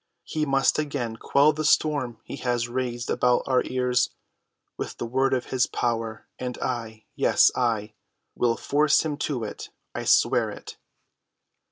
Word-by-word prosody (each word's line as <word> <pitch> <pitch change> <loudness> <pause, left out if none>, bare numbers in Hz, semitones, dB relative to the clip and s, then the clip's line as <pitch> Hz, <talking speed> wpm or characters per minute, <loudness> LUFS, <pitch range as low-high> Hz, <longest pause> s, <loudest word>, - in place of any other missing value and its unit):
He 155 -2 -2
must 135 +2 +2
again 140 -7 -2
quell 140 +6 +3
the 155 +1 -3
storm 145 -6 +2
he - - -7
has 120 -1 -1
raised 120 -1 -3
about 125 0 +2
our 130 -1 +3
ears 125 -1 +1 0.7
with - - -6
the - - -3
word 130 +3 +1
of 130 -2 0
his 130 -1 +2
power, 115 -2 -2
and 125 -1 -4
I—yes, 115 -3 +1
I 110 -4 0 0.4
will 115 -1 +1
force 150 +1 +2
him 150 -2 -1
to 140 -5 -2
it. 105 - -7 0.2
I - - -4
swear - - +3
it!" - - -9
125 Hz, 150 wpm, -25 LUFS, 120-140 Hz, 0.7 s, quell